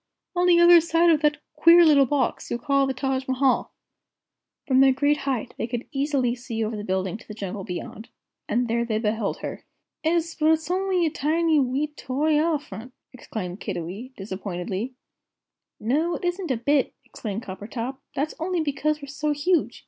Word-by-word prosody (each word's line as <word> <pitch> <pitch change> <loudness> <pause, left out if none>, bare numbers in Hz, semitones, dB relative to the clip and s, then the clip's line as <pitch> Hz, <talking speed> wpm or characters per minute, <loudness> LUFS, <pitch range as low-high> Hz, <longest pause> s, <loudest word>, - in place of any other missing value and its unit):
On 355 0 +2
the 345 -1 +6
other 345 0 +8
side 335 +1 +3
of 310 -2 +3
that 295 -1 +2 0.2
queer 340 +1 +7
little 285 -4 +5
box 275 -1 -1
you 240 - -1
call 275 +2 +1
the 265 - -1
Taj 265 0 -2
Mahal." 260 0 +1 0.9
From 260 -3 +3
their 270 0 +7
great 285 +3 +2
height 245 -3 -2
they 225 - -1
could 240 0 -4
easily 275 -3 0
see 240 -2 -4
over 220 +1 -2
the 205 - -5
building 190 0 -2
to - - -17
the 215 - -8
jungle 195 -1 -5
beyond. 195 +3 -7 0.4
And 245 +2 +1
there 235 +1 0
they 225 -2 -1
beheld 220 -1 -1
her. - - -6 0.4
"'Es, 335 +1 +1
but 315 0 +3
it's 320 +1 -2
only 370 -1 +1
a 315 - 0
tiny 315 +2 +2
wee 265 +2 +1
toy 285 +4 -1
eferlent!" 295 -6 -1 0.2
exclaimed 200 -6 -6
Kiddiwee, 200 +10 -5
disappointedly. 195 +4 -4 0.8
"No, 300 +10 0
it - - -5
isn't 355 0 -2
a 255 - +1
bit," 275 +4 +1
exclaimed 215 +1 -6
Coppertop; 230 +6 -6 0.2
"that's 290 +3 -1
only 355 +2 -1
because 305 0 -1
we're - - -7
so 295 +2 -1
huge. 320 +4 0
270 Hz, 180 wpm, -25 LUFS, 225-310 Hz, 0.9 s, other